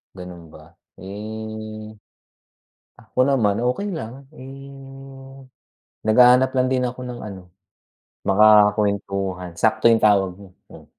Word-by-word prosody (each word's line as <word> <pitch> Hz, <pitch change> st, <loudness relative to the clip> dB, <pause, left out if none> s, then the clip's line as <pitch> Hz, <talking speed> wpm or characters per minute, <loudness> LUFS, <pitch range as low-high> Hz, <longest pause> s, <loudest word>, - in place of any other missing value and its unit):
Ganun 90 Hz, -3 st, -11 dB
ba? 80 Hz, +3 st, -17 dB, 0.2 s
Eh, 110 Hz, +2 st, -8 dB, 1.0 s
ah, -, -, -19 dB
ako -, -, -13 dB
naman 110 Hz, -5 st, +1 dB
okey 180 Hz, +12 st, -2 dB
lang, 135 Hz, -2 st, -8 dB
eh, 135 Hz, 0 st, -11 dB, 1.4 s
naghahanap 125 Hz, +4 st, +5 dB
lang 130 Hz, -1 st, +1 dB
din 130 Hz, 0 st, 0 dB
ako 125 Hz, 0 st, -4 dB
ng 120 Hz, -1 st, -7 dB
ano, 100 Hz, -3 st, -8 dB, 0.9 s
makakuwentuhan, 100 Hz, -3 st, +2 dB
sakto 110 Hz, +4 st, +2 dB
yung 115 Hz, -1 st, +3 dB
tawag 95 Hz, -4 st, +2 dB
mo, 100 Hz, -2 st, -15 dB, 0.2 s
mm. -, -, -14 dB
110 Hz, 115 wpm, -21 LUFS, 100-125 Hz, 1.4 s, naghahanap